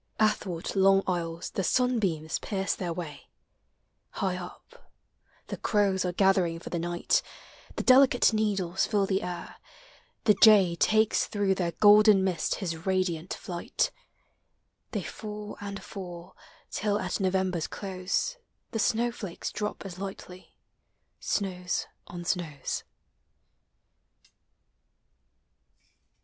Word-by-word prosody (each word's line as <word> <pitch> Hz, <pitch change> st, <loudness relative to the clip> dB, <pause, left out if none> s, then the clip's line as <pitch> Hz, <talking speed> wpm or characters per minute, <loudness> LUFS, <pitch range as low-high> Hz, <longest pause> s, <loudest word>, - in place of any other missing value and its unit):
Athwart 195 Hz, -5 st, 0 dB
long 195 Hz, 0 st, +5 dB
aisles 170 Hz, -2 st, -3 dB
the 195 Hz, -, -2 dB
sunbeams 195 Hz, -10 st, +1 dB
pierce 195 Hz, -2 st, -1 dB
their 175 Hz, -2 st, -4 dB
way; 160 Hz, -4 st, -7 dB, 0.8 s
High 190 Hz, -3 st, -2 dB
up, 180 Hz, -1 st, -11 dB, 0.6 s
the -, -, -6 dB
crows 200 Hz, -3 st, +1 dB
are 180 Hz, -, 0 dB
gathering 185 Hz, -2 st, +2 dB
for 165 Hz, -, -9 dB
the 170 Hz, -, -1 dB
night; 175 Hz, +1 st, +1 dB, 0.5 s
The -, -, -2 dB
delicate 255 Hz, -2 st, +6 dB
needles 195 Hz, -4 st, 0 dB
fill 205 Hz, -3 st, +2 dB
the 195 Hz, 0 st, 0 dB
air; 175 Hz, -1 st, -6 dB, 0.7 s
the 210 Hz, -, +6 dB
jay 200 Hz, -6 st, +7 dB
Takes 215 Hz, +4 st, +3 dB
through 200 Hz, -2 st, +1 dB
their 175 Hz, -3 st, -2 dB
golden 210 Hz, -1 st, +6 dB
mist 185 Hz, -3 st, 0 dB
his 165 Hz, -5 st, -4 dB
radiant 185 Hz, -3 st, 0 dB
flight; 175 Hz, -4 st, -2 dB, 1.0 s
They -, -, -3 dB
fall 210 Hz, -1 st, -7 dB
and 200 Hz, -1 st, -6 dB
fall, 175 Hz, -4 st, -9 dB, 0.4 s
till 205 Hz, 0 st, 0 dB
at 185 Hz, +1 st, -2 dB
November's 185 Hz, -3 st, 0 dB
close 190 Hz, -, -2 dB, 0.3 s
The 225 Hz, -, -2 dB
snow 235 Hz, +3 st, +2 dB
ilakes 200 Hz, -7 st, -6 dB
drop 210 Hz, -1 st, -4 dB
as 185 Hz, -2 st, -8 dB
lightly 190 Hz, -2 st, -9 dB, 0.3 s
— -, -, -48 dB, 0.2 s
snows 180 Hz, -3 st, -2 dB, 0.2 s
on 175 Hz, 0 st, -8 dB
snows. 160 Hz, -7 st, -2 dB
190 Hz, 115 wpm, -28 LUFS, 175-210 Hz, 1.0 s, jay